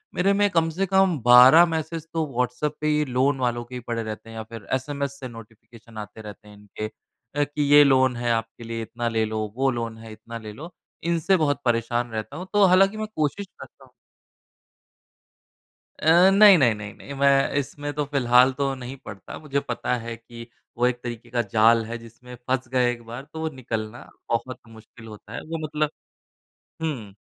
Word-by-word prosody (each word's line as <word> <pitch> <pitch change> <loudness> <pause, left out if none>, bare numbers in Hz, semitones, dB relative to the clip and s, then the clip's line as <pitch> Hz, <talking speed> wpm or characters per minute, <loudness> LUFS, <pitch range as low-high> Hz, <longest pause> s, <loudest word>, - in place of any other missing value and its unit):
मेरे 195 +2 +2
में 205 0 +3
कम 165 -2 +1
से 185 +5 -1
कम 190 -3 +3
12 125 +7 +9
मैसेज 160 -1 -4
तो 165 -1 0
व्हाट्सऐप 125 +4 -1
पे 155 - 0
ही 150 0 +2
लोन 130 +1 +1
वालों 120 -1 -1
के 125 +1 -10
ही 125 - -5
पड़े 115 -1 -2
रहते 110 +1 -7
हैं 115 - -10
या 110 - -4
फ़िर 110 -2 -11
एसएमएस 140 +1 -3
से 130 - -6
नोटिफ़िकेशन 115 0 -14
आते 105 +1 -8
रहते 105 0 -11
हैं 105 - -14
इनके 105 +1 -7 0.5
अ, 145 - +2
कि 145 +1 -4
ये 145 0 +9
लोन 130 -2 +3
है 120 0 -1
आपके 115 +1 -3
लिए 115 0 -5
इतना 120 +1 -4
ले 110 -1 0
लो, 110 0 -3
वो 135 +1 +2
लोन 115 -2 -4
है 110 0 -11
इतना 115 +2 -9
ले 110 -1 -9
लो। 160 +9 -10 0.3
इनसे 170 +2 +2
बहुत 145 -3 0
परेशान 120 0 0
रहता 110 +5 -5
हूँ। 185 +1 -7
तो 205 0 +5
हालाँकि 195 +3 +4
मैं 215 - -3
कोशिश 155 +7 -1
करता - - -15
हूँ। - - -24 2.1
अ, 170 +4 +6
नहीं, 200 -1 +8
नहीं, 120 -7 +4
नहीं, 105 -1 -8
नहीं, 140 - -10
मैं 140 -1 +4
इसमें 145 +1 -5
तो 150 +1 -1
फ़िलहाल 130 -2 +4
तो 135 0 -1
नहीं 130 +1 -8
पड़ता। 100 -2 -9
मुझे 140 -2 -2
पता 125 -1 -2
है 115 0 -6
कि 115 +1 -12 0.3
वो 120 - +2
एक 120 -1 -2
तरीके 120 -1 -7
का 120 0 0
जाल 115 +2 +3
है, 120 +1 -5
जिसमें 115 +2 -13
फँस 130 -1 -1
गए 125 -1 +2
एक 120 -1 -7
बार, 120 +4 -8
तो 155 +2 -10
वो 160 0 -2
निकलना 120 -4 -6 0.2
बहुत 120 +2 -2
मुश्किल 115 +1 -15
होता 105 +1 -12
है। - - -5
वो 165 - -3
मतलब 150 0 -1 0.9
हुँ, 125 -11 -4
125 Hz, 200 wpm, -24 LUFS, 115-150 Hz, 2.1 s, 12